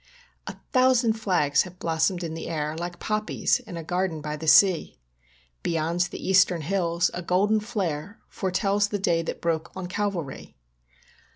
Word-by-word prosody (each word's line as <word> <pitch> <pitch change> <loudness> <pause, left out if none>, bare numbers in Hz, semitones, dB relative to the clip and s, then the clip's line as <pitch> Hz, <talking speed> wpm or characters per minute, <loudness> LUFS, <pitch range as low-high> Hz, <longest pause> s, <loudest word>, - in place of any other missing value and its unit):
A - - -5 0.2
thousand 255 -3 +4
flags 180 -10 +2
have 180 -1 -7
blossomed 165 +2 0
in 165 -1 -4
the 165 - -6
air 155 -1 -2
Like 175 +1 -5
poppies 215 +2 0
in 215 -8 -9
a 165 - -5
garden 180 -1 -1
by 150 0 -4
the 160 +1 -7
sea. 185 - +5 0.6
Beyond 165 +1 -1
the - - -7
eastern 185 -3 +4
hills 170 0 0
a 180 - -4
golden 200 +5 +2
flare 200 -4 -4
Foretells 195 +2 0
the 205 - -2
day 175 -4 +1
that 165 - -5
broke 165 -2 -1
on 190 -1 -5
Calvary. 180 -6 -4
180 Hz, 160 wpm, -25 LUFS, 165-200 Hz, 0.6 s, sea